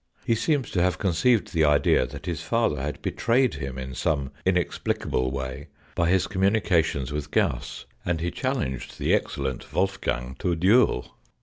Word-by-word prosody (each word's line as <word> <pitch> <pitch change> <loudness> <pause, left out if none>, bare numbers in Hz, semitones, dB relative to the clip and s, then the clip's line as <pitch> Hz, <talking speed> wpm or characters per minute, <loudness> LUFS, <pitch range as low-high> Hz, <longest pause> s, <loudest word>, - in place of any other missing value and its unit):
He - - +3
seems 140 +2 0
to 90 - +1
have 90 +1 +2
conceived 100 +3 +2
the 80 -2 +3
idea 75 -1 +4
that - - -9
his 85 -3 -3
father 85 - 0
had 75 +2 -4
betrayed 125 +2 +2
him 70 -2 -5
in 65 0 -6
some 70 -1 -1 0.2
inexplicable 90 -7 0
way 65 -1 -5 0.3
by 85 0 +1
his 95 -1 +3
communi 100 +3 +2
cations 80 -7 +1
with 75 0 -4
Gauss, - - -1 0.2
and 85 -2 -1
he 85 +1 -2
challenged 125 - -3
the - - +1
excellent 65 -2 -2
Wolfgang 65 -10 -1
to 90 -3 0
a - - 0
duel. 95 - +3
85 Hz, 170 wpm, -25 LUFS, 70-95 Hz, 0.3 s, idea